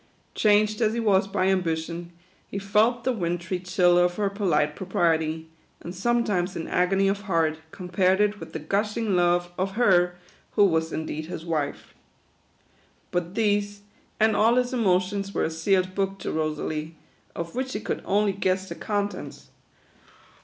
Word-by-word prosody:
Changed 210 +1 +3
as 220 -1 +2
he - - -1
was 200 -4 +3
by 195 -1 0
ambition, 170 -2 -1 0.4
he - - -6
felt 215 +4 +2
the 260 - +1
wintry 175 -3 -2
chill 180 -1 +3
of 175 0 +2
her 200 -1 0
polite 150 -7 +1
propriety, 160 -3 0 0.3
and 170 - -7
sometimes 200 -3 0
in 165 - -4
agony 190 +2 +2
of 200 +1 0
heart, 160 -3 +1
compared 185 +2 +1
\\y 210 0 +3
with - - -9
the - - -4
gushing 205 +6 -1
love 175 0 +2
of 190 +1 -1
her 180 -6 +3 0.4
who 205 - +5
was 160 -3 +1
indeed 155 0 -4
his 165 -1 -7
wife. 155 -4 -3 1.2
But 175 +1 -2
these, 205 -2 0 0.4
and 220 0 +4
all 225 +3 +4
his 250 +1 +1
emotions, 195 -2 0
were - - +1
a 160 - -1
sealed 185 +3 +1
book 195 0 -1
to - - -3
Rosalie, 155 0 -3 0.4
of 170 0 -5
which 260 +1 -2
she 210 - -3
could 220 - -3
only 205 0 +1
guess 190 0 -1
the - - -4
con 205 -1 -1
tents. 205 - -10
185 Hz, 160 wpm, -25 LUFS, 170-205 Hz, 1.2 s, who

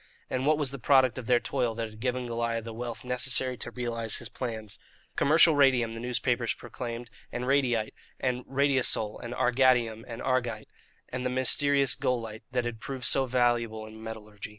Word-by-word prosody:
And 130 +2 -1
what 155 0 +4
was 145 -4 0
the 140 - -7
product 130 0 +3
of 120 - -8
their 125 -1 +4
toil 120 -3 -1
that 115 0 -3
had 110 0 -14
given 125 +1 -2
Goliah 115 -1 -2
the 115 0 -7
wealth 115 -1 -6
necessary 125 0 +3
to 120 - -6
realize 115 -2 -2
his 120 - -5
plans? 110 -3 -1 0.4
Commercial 160 +2 +5
radium, 130 -5 +3
the 115 - -6
newspapers 120 0 -1
proclaimed; 120 -1 -7 0.2
and 125 +1 -4
radiyte, 125 -5 +1 0.3
and 125 -1 -1
radiosole, 130 -6 +1
and 120 +1 -5
argatium, 125 -3 +2
and 115 -1 -7
argyte, 120 -4 -1 0.4
and 125 0 -4
the 125 - 0
mysterious 135 +1 +3
golyte 115 -3 -2
(that 125 -1 0
had 120 -2 -4
proved 130 +2 -4
so 135 -1 +3
valuable 120 -3 0
in 110 0 -12
metallurgy). 105 -2 -8
120 Hz, 175 wpm, -28 LUFS, 115-130 Hz, 0.4 s, Commercial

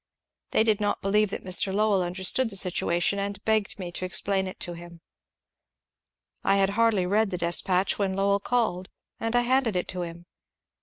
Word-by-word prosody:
They - - +3
did 215 -2 +1
not 205 - -1
believe 210 +1 +2
that - - -5
Mr. 185 +1 -1
Lowell 205 -1 +2
under 180 +1 -4
stood 250 +6 +3
the 200 - -8
situation, 180 +1 0
and 200 0 -3
begged 220 -2 +1
me 180 -3 -6
to 180 - -5
explain 190 +1 0
it 185 - -8
to 175 - -1
him. 170 0 -12 1.4
I 195 - +3
had 195 0 +2
hardly 215 -3 +2
read 210 +3 +2
the 180 - -3
despatch 180 +3 +1
when 195 -2 0
Lowell 200 +1 +2
called, 200 -5 -1 0.3
and 225 +1 -2
I 245 - +4
handed 245 -3 +1
it 180 - -1
to 180 - -4
him. 170 0 -7
195 Hz, 190 wpm, -26 LUFS, 180-210 Hz, 1.4 s, I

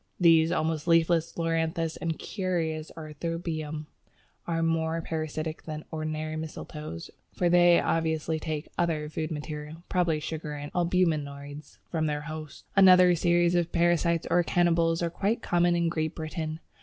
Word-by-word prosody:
These 165 -2 +5
almost 160 -2 -1
leafless 165 0 +3
Loranthus, 165 -1 0
and 165 - -4
the - - -15
curious 165 -5 -2
Arceuthobium 155 -1 -4 0.6
are 165 -1 0
more 165 0 0
parasitic 155 -1 -4
than 155 -1 -6
ordinary 155 0 -3
mistletoes, 150 - -7 0.2
for 175 - +2
they 175 0 +6
obviously 160 -1 0
take 155 -1 -4
other 160 -3 0
food 155 +1 -3
material 150 +1 -6
(probably 170 -4 +1
sugar 155 -1 -5
and 145 0 -7
albuminoids) 150 -5 -1
from 160 -2 0
their 150 -1 -2
"host." 155 -1 -8
Another 185 -2 +7
series 175 0 +3
of 175 -1 +1
parasites 170 -1 +2
or 175 +1 +5
cannibals 170 -1 +2
are 170 - -1
quite 205 +6 -1
common 175 0 +2
in 170 0 +1
Great 155 -2 -2
Britain. 160 0 -4
165 Hz, 145 wpm, -28 LUFS, 155-170 Hz, 0.6 s, Another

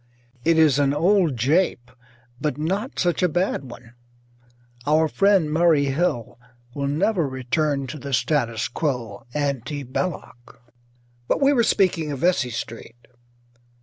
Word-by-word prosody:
It 165 0 +3
is 150 -4 +4
an 140 0 +2
old 170 -3 +2
jape 135 0 +1 0.5
but 150 -3 -2
not 195 - -3
such 175 -1 0
a 180 - +3
bad 160 -6 -1
one: 120 0 -13 0.9
our 155 +2 +3
friend 195 -4 +2
Murray 160 -3 +3
Hill 135 -8 -1 0.3
will 140 +1 -2
never 165 +2 +1
return 135 +2 -1
to 145 +4 -7
the 140 +1 -7
status 120 -3 0
quo 120 -7 -4
ante 145 0 -2
Belloc. 130 -3 -5 0.7
But - - +1
we 280 +1 +4
were 245 - +3
speaking 175 -8 +1
of 140 - -3
Vesey 140 -4 +1
Street. 115 0 -8
150 Hz, 135 wpm, -23 LUFS, 130-170 Hz, 0.9 s, is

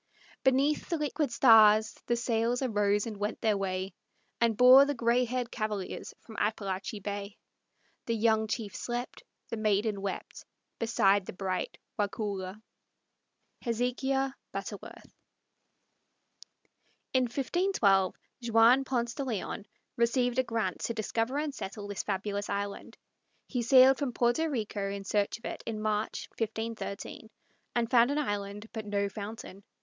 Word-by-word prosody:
Beneath 275 +3 +2
the 335 - 0
liquid 295 -2 -1
stars 220 -3 +6
the 240 - +2
sails 235 +1 0
Arose 205 -4 +1
and 220 -3 -6
went 210 +2 -3
their 220 -2 +2
way, 190 -1 -2 0.5
And 230 -2 +2
bore 255 +2 +9
the 285 0 -1
gray 240 +1 +2
haired 245 0 -3
cavaliers 210 -4 -4
from 225 - -12
Appalachee 205 -1 -2
Bay. 200 0 -5 0.7
The 230 - +1
young 220 0 +2
chief 210 -2 -4
slept, 240 +1 -4 0.3
The 230 - -3
maiden 210 -1 +1
wept, 195 -1 -5 0.4
Beside 200 -4 +3
the - - -6
bright 185 -1 -3 0.2
Waukulla. 205 -1 -3 1.0
HEZEKIAH 260 +3 0 0.2
BUTTERWORTH. 195 +1 -8 2.0
In 260 -1 +3
1512 240 - +2 0.3
Juan 230 +4 +6
Ponce 240 -3 -1
de 280 - -3
Leon 220 -3 -4 0.3
received 245 +1 +2
a - - +4
grant 225 -6 -2
to 235 - -3
discover 225 +4 -1
and 295 -1 -2
settle 205 -4 -6
this 205 -1 -3
fabulous 205 +1 -3
island. 200 0 -4 0.5
He 250 - -2
sailed 260 +2 +6
from 275 -4 -2
Porto 240 +8 +2
Rico 210 -7 -2
in 200 0 -5
search 200 +1 0
of 230 - -15
it - - -5
in 220 -2 -3
March, 215 0 -2
1513, 220 -1 -4 0.5
and 235 0 0
found 240 -1 +6
an 285 - 0
island 205 -6 -3
but 220 -2 -5
no 200 0 0
fountain. 200 -1 -8
225 Hz, 135 wpm, -30 LUFS, 205-245 Hz, 2.0 s, bore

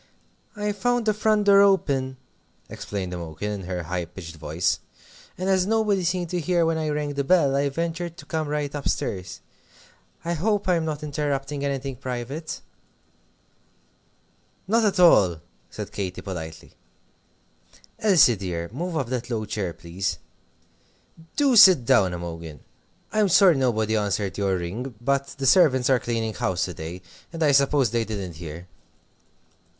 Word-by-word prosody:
"I 210 0 -1
found 240 +4 0
the 215 - +3
front 210 0 +1
door 200 0 +7
open," 140 -10 +2 0.5
explained 95 -3 -5
Imogen, 85 +4 -5
in 100 -2 -4
her 90 -2 -3
high 90 +1 -3
pitched 85 -1 -10
voice, 80 +2 -1 0.6
"and 185 - -3
as 190 -1 +2
nobody 210 -3 +1
seemed 175 0 -1
to 180 - -1
hear 170 +1 +1
when 160 0 0
I 155 -1 -1
rang 150 -1 -2
the 140 0 -1
bell, 145 -3 +3
I 140 +1 +1
ventured 170 +3 -4
to - - -11
come 160 -2 -2
right 145 -1 -2
up 145 -1 -2
stairs. 95 -1 -3 0.8
I 170 - 0
hope 205 +5 0
I'm 170 -3 +2
not 155 -1 -4
interrupting 145 -1 -2
anything 135 -2 -3
private?" 130 +5 -5 2.1
"Not 225 +3 +3
at 200 -2 +1
all," 95 - +5 0.3
said - - -7
Katy, 95 -3 -4
politely. 80 -5 -7 1.3
"Elsie, 170 - +5
dear, 85 -2 -4
move 170 +4 -3
up 140 - 0
that 125 -1 -3
low 110 -3 -2
chair, 105 -4 -3
please. 85 +4 -4 1.2
Do 280 -4 +3
sit 185 - +8
down, 95 -5 +3
Imogen! 85 -3 -7 0.5
I'm 215 -2 +3
sorry 185 -1 +6
nobody 110 -5 +1
answered 100 -2 -1
your 100 -2 0
ring, 110 +9 -5
but 140 +3 0
the 135 - -3
servants 130 -4 +4
are 130 - +4
cleaning 115 -2 -2
house 90 -1 -1
to 90 - -6
day, 85 +3 -8 0.3
and 165 -1 -3
I 150 - +4
suppose 140 -3 +3
they 115 -1 +1
didn't 100 -7 -5
hear." 85 +1 -8
135 Hz, 155 wpm, -24 LUFS, -, 2.1 s, sit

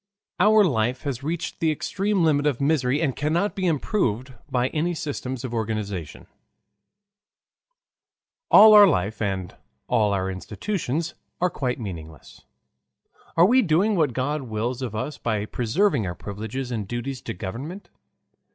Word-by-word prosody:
Our 210 +3 +6
Life 125 - 0
has 140 -4 -3
Reached 165 +4 -4
the 165 - +2
Extreme 195 +5 0
Limit 150 -2 +3
of 140 -5 0
Misery 140 -2 +1
and 135 -5 0
Cannot 165 +8 0
be 190 -2 -1
Improved 130 - -1 0.2
by 125 0 +1
any 170 +3 -1
Systems 130 -5 -4
of 125 -2 -5
Organization 105 -7 -4 2.2
All 215 +1 +9
our 205 -1 +9
Life 105 - 0
and 95 -4 -2 0.3
all 105 -2 +2
our 95 -1 -1
Institutions 160 - -3 0.3
are 180 0 +1
Quite 125 -5 -2
Meaningless 80 - -9 1.0
Are 170 - +7
we 250 +6 +5
Doing 195 +3 +2
what 155 -8 +1
God 145 +4 -1
Wills 120 +1 -3
of 120 -5 -4
us 130 +7 -4
by 105 -3 -1
Preserving 125 - 0
our 90 - -4
Privileges 110 +7 -6
and 110 -5 -3
Duties 120 +3 -4
to 115 - -6
Government? 130 - -7
130 Hz, 140 wpm, -24 LUFS, 110-165 Hz, 2.2 s, All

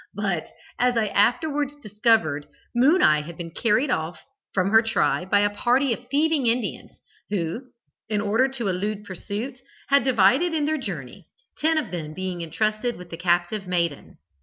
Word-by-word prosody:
But, 195 -6 -1 0.3
as 245 -1 +2
I 215 -2 +1
afterwards 285 +7 +1
discovered,'Moon 225 - +1
eye' 150 0 +5
had 165 +2 -9
been 165 -1 -6
carried 240 - +1
off 160 -4 -2 0.3
from 190 0 +1
her 225 0 +7
tribe 225 -4 0
by 205 +1 +4
a 205 - +3
party 250 +4 +2
of 245 +2 -9
thieving 290 -1 +2
Indians, 230 -1 -2 0.3
who, 205 +5 -3 0.4
in 210 -1 0
order 215 +6 +2
to 260 -5 -4
elude 200 +3 -2
pursuit, 210 +7 -6 0.3
had 280 -2 +5
divided 260 - +3
in 300 -2 +1
their 310 0 0
journey, 155 - -7 0.3
ten 320 +1 +2
of 310 - -1
them 155 -3 -5
being 185 -2 -4
entrusted 215 +8 -1
with 180 -1 -12
the 165 - -6
captive 175 +3 0
maiden. 170 -5 -2
215 Hz, 160 wpm, -24 LUFS, 180-255 Hz, 0.4 s, her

